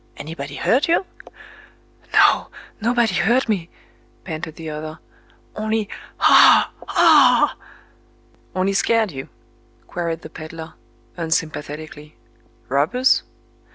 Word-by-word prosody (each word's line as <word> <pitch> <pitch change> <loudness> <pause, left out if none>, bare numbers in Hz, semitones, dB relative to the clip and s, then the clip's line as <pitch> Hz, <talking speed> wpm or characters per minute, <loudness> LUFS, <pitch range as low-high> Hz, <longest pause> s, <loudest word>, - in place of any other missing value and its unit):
Anybody 145 -2 -7
hurt 265 - +1
you?" 340 +3 +2 1.1
"No—nobody 235 -2 +1
hurt 230 +9 +2
me," 185 -6 -2 0.5
panted 160 -2 -6
the 165 -1 -9
other,—"only... 205 +7 -6 0.3
Ah!—aa!" 295 -5 +5 1.0
"—Only 190 +1 0
scared 220 0 +1
you?" 135 -2 -8 0.6
queried 170 -2 -4
the - - -9
peddler, 160 0 -9 0.4
unsympathetically. 155 -2 -4 0.5
"Robbers?" 155 - +2
175 Hz, 80 wpm, -21 LUFS, 155-230 Hz, 1.1 s, Ah!—aa